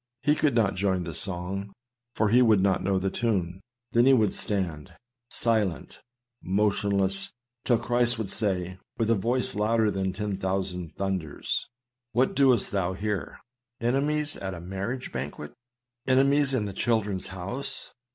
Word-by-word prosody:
He 150 Hz, +2 st, +4 dB
could 150 Hz, -4 st, +1 dB
not 110 Hz, -5 st, +3 dB
join 95 Hz, -1 st, 0 dB
the 85 Hz, -1 st, -5 dB
song, 95 Hz, +3 st, -1 dB, 0.4 s
for 110 Hz, -, +2 dB
he 120 Hz, +4 st, +5 dB
would 110 Hz, -5 st, +5 dB
not 95 Hz, -1 st, +2 dB
know 95 Hz, 0 st, +1 dB
the 95 Hz, +1 st, -1 dB
tune. 95 Hz, -6 st, -1 dB, 0.3 s
There 120 Hz, -, +4 dB
he 135 Hz, +2 st, +6 dB
would 110 Hz, -6 st, +3 dB
stand, 90 Hz, -8 st, -3 dB, 0.3 s
silent, 110 Hz, -7 st, -1 dB, 0.4 s
motionless; 100 Hz, 0 st, +1 dB, 0.4 s
till 120 Hz, -, +4 dB
Christ 120 Hz, +1 st, +1 dB
would 105 Hz, -3 st, -3 dB
say, 95 Hz, -3 st, -1 dB, 0.2 s
with 115 Hz, 0 st, +1 dB
a -, -, +6 dB
voice 120 Hz, +5 st, 0 dB
louder 110 Hz, +1 st, +2 dB
than 95 Hz, -1 st, -1 dB
ten 105 Hz, 0 st, -3 dB
thousand 95 Hz, -3 st, -3 dB
thunders, 95 Hz, -6 st, -2 dB, 0.2 s
" 125 Hz, -1 st, -60 dB
What 125 Hz, +3 st, +2 dB
dost 130 Hz, -5 st, +4 dB
thou 95 Hz, -2 st, 0 dB
here? 100 Hz, -4 st, -3 dB, 0.4 s
Enemies 145 Hz, +5 st, 0 dB
at 95 Hz, -1 st, -4 dB
a -, -, -7 dB
mar 95 Hz, +3 st, -4 dB
riage 125 Hz, +1 st, -4 dB
banquet? 75 Hz, +3 st, -5 dB, 0.5 s
Enemies 135 Hz, +1 st, +3 dB
in 110 Hz, -5 st, 0 dB
the 100 Hz, -, -5 dB
children's 105 Hz, -3 st, 0 dB
house? 95 Hz, +9 st, -6 dB
100 Hz, 155 wpm, -27 LUFS, 95-120 Hz, 0.5 s, he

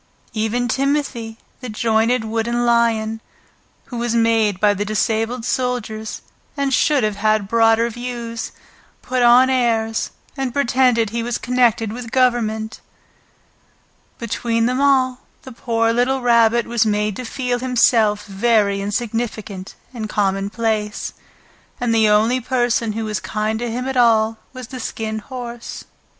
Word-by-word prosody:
Even 225 Hz, +3 st, -1 dB
Timothy, 265 Hz, -4 st, -1 dB, 0.2 s
the 255 Hz, -, -7 dB
jointed 225 Hz, +2 st, +1 dB
wooden 230 Hz, +2 st, -1 dB
lion, 225 Hz, -2 st, +1 dB, 0.6 s
who 245 Hz, -, -7 dB
was 235 Hz, 0 st, -1 dB
made 225 Hz, -4 st, +2 dB
by 210 Hz, 0 st, +4 dB
the 205 Hz, +1 st, -2 dB
disabled 225 Hz, +3 st, -1 dB
soldiers, 240 Hz, -4 st, -3 dB, 0.3 s
and 280 Hz, -1 st, 0 dB
should 285 Hz, -1 st, +3 dB
have 210 Hz, -1 st, -1 dB
had 215 Hz, -1 st, +1 dB
broader 225 Hz, +1 st, +3 dB
views, 235 Hz, -1 st, -5 dB, 0.5 s
put 255 Hz, -1 st, -1 dB
on 245 Hz, +2 st, +6 dB
airs 230 Hz, -4 st, 0 dB, 0.3 s
and 265 Hz, -2 st, -3 dB
pretended 245 Hz, -5 st, +2 dB
he 235 Hz, +1 st, -2 dB
was 235 Hz, 0 st, -2 dB
connected 240 Hz, -4 st, +1 dB
with 240 Hz, -1 st, -7 dB
Government. 225 Hz, -3 st, 0 dB, 1.4 s
Between 230 Hz, 0 st, -1 dB
them 255 Hz, +3 st, 0 dB
all 260 Hz, -2 st, +3 dB, 0.2 s
the 260 Hz, -, -10 dB
poor 230 Hz, -1 st, 0 dB
little 255 Hz, +3 st, +1 dB
Rabbit 235 Hz, -1 st, +4 dB
was 235 Hz, -1 st, +1 dB
made 210 Hz, -1 st, 0 dB
to 255 Hz, -, -5 dB
feel 245 Hz, 0 st, -2 dB
himself 230 Hz, -4 st, +2 dB
very 200 Hz, -1 st, +1 dB
insignificant 210 Hz, -2 st, -4 dB, 0.2 s
and 220 Hz, -3 st, -5 dB
commonplace, 210 Hz, +2 st, -1 dB, 0.7 s
and 245 Hz, -2 st, 0 dB
the 220 Hz, -1 st, +4 dB
only 225 Hz, +5 st, +3 dB
person 240 Hz, -3 st, 0 dB
who 225 Hz, +1 st, -3 dB
was 210 Hz, -2 st, -2 dB
kind 215 Hz, +1 st, -2 dB
to 240 Hz, 0 st, -3 dB
him 250 Hz, +3 st, -3 dB
at 265 Hz, -, -3 dB
all 225 Hz, -2 st, +3 dB
was 255 Hz, -2 st, -9 dB
the 255 Hz, -, -7 dB
Skin 220 Hz, -2 st, -4 dB
Horse. 240 Hz, 0 st, -7 dB
230 Hz, 135 wpm, -20 LUFS, 220-245 Hz, 1.4 s, on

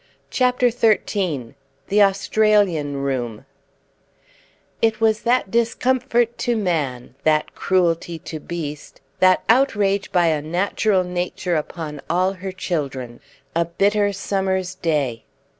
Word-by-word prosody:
CHAPTER 250 Hz, -1 st, +2 dB
XIII 195 Hz, -, 0 dB, 0.4 s
THE 210 Hz, +1 st, +4 dB
AUSTRALIAN 195 Hz, -7 st, +2 dB
ROOM 120 Hz, -5 st, -3 dB, 1.4 s
It 220 Hz, -1 st, +2 dB
was 220 Hz, -1 st, +2 dB
that 240 Hz, -5 st, +1 dB
discomfort 240 Hz, 0 st, +1 dB
to 240 Hz, -1 st, 0 dB
man, 145 Hz, -, -2 dB
that 155 Hz, -1 st, +2 dB
cruelty 170 Hz, -2 st, 0 dB
to 160 Hz, 0 st, -7 dB
beast, 150 Hz, -2 st, -6 dB, 0.2 s
that 185 Hz, 0 st, +4 dB
outrage 210 Hz, -6 st, +2 dB
by 175 Hz, -1 st, +3 dB
unnatural 180 Hz, +6 st, +1 dB
Nature 180 Hz, 0 st, -2 dB
upon 150 Hz, -1 st, -4 dB
all 185 Hz, +3 st, +2 dB
her 190 Hz, 0 st, -6 dB
children 135 Hz, -10 st, -4 dB, 0.4 s
a 170 Hz, -, +3 dB
bitter 205 Hz, +4 st, +1 dB
summer's 190 Hz, -2 st, -1 dB
day. 150 Hz, -10 st, -1 dB
185 Hz, 110 wpm, -21 LUFS, 155-210 Hz, 1.4 s, THE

